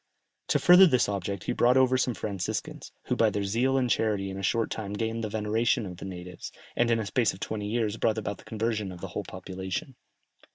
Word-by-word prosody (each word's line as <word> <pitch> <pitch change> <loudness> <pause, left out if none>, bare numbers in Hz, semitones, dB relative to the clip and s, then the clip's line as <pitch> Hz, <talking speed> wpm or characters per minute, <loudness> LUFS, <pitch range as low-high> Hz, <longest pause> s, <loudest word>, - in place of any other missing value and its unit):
To - - +3
further 180 +2 +8
this 125 -7 +3
object 100 -1 -3
he - - -2
brought 125 +2 +4
over 130 -1 +4
some 125 -2 +1
Franciscans, 100 -4 -4
who - - -1
by - - +4
their 100 - -2
zeal 120 +7 +1
and 130 -2 +2
charity 105 -4 0
in 95 - -6
a - - -4
short 115 +4 0
time 105 -2 -4
gained 115 +2 -2
the 110 - -2
veneration 110 +2 +1
of 90 -2 -7
the - - -8
natives, 90 -2 -8 0.2
and 120 0 +2
in 115 - +3
a 110 - -2
space 110 +2 +1
of - - -14
twenty 105 0 -4
years 110 -1 -1
brought 110 -1 +1
about 100 -2 -4
the - - -14
conversion 110 -3 -2
of 90 - -9
the - - -5
whole - - -4
population. 95 +7 -5
110 Hz, 230 wpm, -28 LUFS, 100-120 Hz, 0.2 s, further